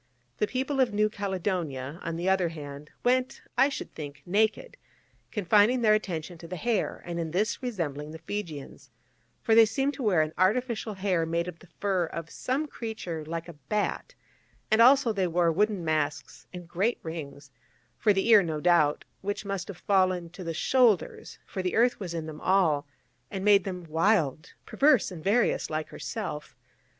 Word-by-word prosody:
The 210 - +2
people 265 +3 -2
of 255 -3 +3
New 210 0 +2
Caledonia, 175 -8 -3
on 165 0 -4
the 175 +2 -3
other 190 -2 +2
hand, 150 -2 -9 0.2
went, 255 +1 +1
I 265 +3 +5
should 280 - -6
think, 145 -2 -8
naked, 220 - 0 0.5
confining 210 +4 +3
their 215 -1 +6
attention 175 -5 -2
to 165 - -10
the 180 - -5
hair, 230 +4 -1
and 170 -1 -4
in 165 -1 -2
this 205 +10 -1
resembling 160 - -3
the 160 - -8
Fijians, 165 -4 -7 0.5
for 225 - +3
they 225 0 +8
seemed 270 +5 0
to 285 - -8
wear 190 -9 +3
an 155 +1 -5
artificial 220 +2 +1
hair 190 -3 0
made 170 +1 -1
of 175 -1 -7
the 175 - -18
fur 190 -4 +1
of 165 0 -7
some 270 +4 -2
creature 220 - -5
like 165 +2 -5
a 170 - -8
bat, 205 - -3 0.6
and 220 +1 +5
also 255 -1 +6
they 190 -3 0
wore 170 0 +2
wooden 200 0 0
masks, 155 -1 -2
and 180 -2 -9
great 195 +8 0
rings 145 -3 -7 0.5
for 215 - +4
the 195 +1 +1
ear, 215 -3 +8
no 160 -4 -3
doubt 155 -3 +3 0.2
which 205 +1 -3
must 195 -3 -3
have 200 - -8
fallen 185 -4 +1
to 180 +1 -9
the 165 - -3
shoulders: 240 -1 +2
for 190 - -5
the 185 -1 -2
earth 240 +2 +3
was 175 -4 -5
in 160 -1 -3
them 155 -1 -8
all, 165 -7 +2 0.4
and 195 -1 -4
made 200 -2 +5
them 180 -2 -5
wild, 160 -2 +1
perverse 275 -8 +3
and 165 -4 -8
various 220 +6 +2
like 155 0 -3
herself. 170 -9 -6
185 Hz, 180 wpm, -28 LUFS, 165-215 Hz, 0.6 s, they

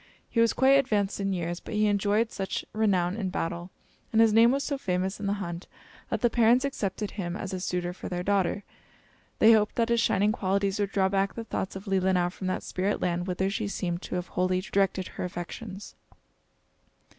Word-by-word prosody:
He 230 - 0
was 230 -1 +4
quite 270 +1 +5
advanced 210 -8 0
in 195 0 -1
years; 175 -1 -2
but - - -7
he 210 0 +3
enjoyed 205 +2 +2
such 195 -1 -3
renown 195 -4 +1
in 200 -4 -2
battle, 170 0 -3 0.4
and 225 - +2
his 225 -1 +5
name 230 +2 +7
was 275 +2 +1
so 285 - -1
famous 190 -5 -2
in 200 - -3
the 200 - +1
hunt, 175 -3 -5 0.4
that - - -2
the 240 - +4
parents 240 +3 +4
accepted 210 -6 -3
him 175 -4 -4
as 195 -1 -5
a 185 - -2
suitor 180 -1 -2
for - - -7
their 180 0 -3
daughter. 200 0 +1 0.7
They 220 - +7
hoped 210 -1 +2
that 230 -1 +1
his 235 -1 +3
shining 205 -1 +2
qualities 200 0 0
would 200 -1 0
draw 190 -1 +2
back 195 0 0
the 230 - -4
thoughts 190 -4 -4
of 190 +2 -7
Leelinau 185 -2 +1
from 185 0 -6
that 185 - -2
spirit 195 +3 -1
land 175 0 -1
whither 185 +1 0
she 205 +2 -2
seemed 175 -3 -3
to - - -5
have 180 0 -3
wholly 185 0 +1
directed 190 0 0
her - - -6
affections. 185 +3 -7
195 Hz, 205 wpm, -27 LUFS, 185-215 Hz, 0.7 s, name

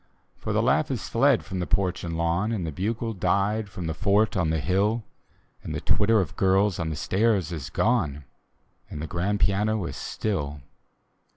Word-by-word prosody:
For - - -5
the - - +2
laugh - - +2
is - - -3
fled - - +3
from 95 - -4
the 90 - -2
porch 95 -3 0
and 85 -1 -3
lawn, 85 +6 0
And 100 -7 -2
the 80 - -3
bugle 110 +7 -2
died 100 +3 0
from 90 -3 -6
the 80 - -2
fort 105 +5 +2
on 90 -5 +1
the 80 0 +1
hill, 100 +8 +1 0.6
And - - -5
the - - -1
twitter 110 +2 +3
of 90 -2 -2
girls 95 0 +2
on 80 -1 -1
the 80 - -3
stairs 95 +1 +1
is 75 -6 -5
gone, 85 - +1 0.7
And - - -6
the 75 - -3
grand 95 +5 -1
piano 105 0 +1
is 70 - -5
still. 75 - -3
95 Hz, 190 wpm, -26 LUFS, 85-105 Hz, 0.7 s, fled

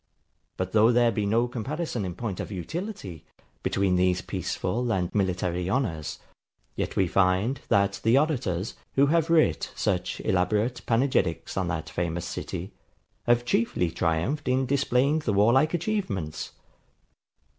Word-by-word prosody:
But 95 0 -2
though 110 +3 +5
there 120 -1 +4
be 105 -2 -1
no 115 +4 +2
comparison 125 - -3
in 90 -2 -5
point 100 -2 -4
of - - -5
utility, 100 - -5 0.4
between 95 -2 +1
these 90 0 +2
peaceful 100 +5 -2
and 90 -4 -1
military 90 -2 0
honours; 95 - -1 0.6
yet - - -3
we 95 - +3
find, 95 +9 +1
that 100 0 +2
the 115 +4 +4
orators, 125 - 0 0.2
who 140 - +5
have 165 -1 +2
writ 165 -2 +3
such - - -1
elaborate 105 +7 +1
panegyrics 115 -8 +1
on 95 -2 0
that 80 -1 -3
famous 85 0 -2
city, - - -5 0.5
have 120 0 +3
chiefly 110 -8 +1
triumphed 85 - -1
in 130 +1 +2
displaying 140 +2 +2
the 115 -9 -1
warlike 120 - +4
achievements. 155 - -3
105 Hz, 135 wpm, -26 LUFS, 90-130 Hz, 0.6 s, though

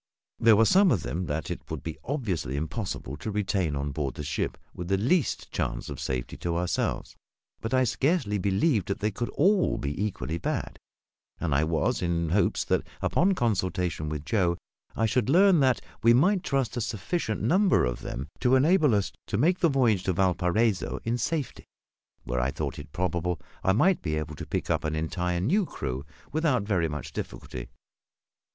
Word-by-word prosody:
There 115 -1 +6
were 115 +2 +5
some 190 - +5
of 95 - +1
them 80 +9 -3
that 75 +1 -3
it - - -4
would - - -5
be 80 - -6
obviously 100 - -2
impossible 80 - -4
to 110 - -5
retain 95 -6 0
on 70 +1 -2
board 70 -1 -3
the 75 - -5
ship 70 - -2 0.2
with 90 - -6
the 95 +1 +2
least 135 - +1
chance - - -2
of - - -6
safety 65 -2 -3
to 85 -1 -2
ourselves; 90 0 -1 0.4
but 115 - -4
I 130 0 +4
scarcely 125 - +1
believed 100 - +1
they 105 +2 -1
could 120 +4 -3
all 190 +4 +3
be 75 +8 -2
equally 85 -5 -3
bad, - - -3 0.6
and 80 -4 -1
I 70 +3 +3
was 85 +10 0
in 85 -2 0
hopes 100 +5 +2
that, - - +1 0.2
upon 190 +3 +2
consultation 90 - -1
with 75 -1 -4
Joe, 90 -5 +1 0.4
I 115 - +1
should 120 +1 +1
learn 185 +2 +6
that 130 -3 +3 0.2
we 115 0 +6
might 185 +9 +4
trust 135 -6 -1
a 120 - -1
sufficient 110 - -2
number 185 - +4
of - - -3
them 65 +4 -5
to 125 +1 +4
enable 150 - +4
us 100 -2 0 0.2
to - - -1
make 175 - +3
the 170 - +4
voyage 120 -9 +3
to 95 - +1
Valparaiso 95 +3 +1
in 120 +2 -1
safety, 145 +1 -2 0.6
where 60 +1 -2
I 60 - +1
thought - - -4
it - - -10
probable 90 0 -1 0.2
I 95 - +3
might 180 - +3
be 75 -2 -1
able 75 0 -3
to - - -7
pick - - -2
up - - +1
an 80 0 -1
entire 85 +2 -1
new 190 - +2
crew, 70 0 -5 0.2
without 150 -7 +1
very 95 -5 +1
much 75 -4 -6
difficulty. - - -6
100 Hz, 185 wpm, -27 LUFS, 80-130 Hz, 0.6 s, There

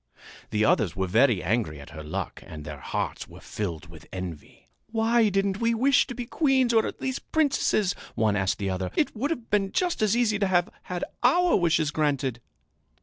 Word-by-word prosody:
The 105 0 +1
others 105 -5 +2
were 95 0 0
very 110 - +3
angry 95 -6 -1
at 70 - -11
her 80 +1 -8
luck 75 0 -5
and 75 -2 -9
their 75 -2 -7
hearts - - -3
were - - -13
filled 95 -4 -5
with 85 -2 -14
envy. 90 -5 -8 0.2
"Why 225 0 +2
didn't 195 0 0
we 230 0 +2
wish 265 +3 +4
to 250 - -6
be 245 0 -4
queens 265 -3 +2
or 225 -1 +4
at - - -7
least 260 0 -4
princesses?" 270 - +2 0.2
one 110 -2 +2
asked 95 -2 0
the 100 -2 -2
other. 95 0 -2
"It 295 - +1
would 265 +7 -1
have 240 -8 -4
been 195 -2 +1
just 360 -7 0
as 215 +1 +3
easy 220 -4 +2
to 200 - +2
have 175 -1 +2 0.2
had 180 -1 -3 0.2
our 345 +8 +4
wishes 165 -4 +2
granted!" 140 -6 0
175 Hz, 200 wpm, -26 LUFS, -, 0.2 s, wish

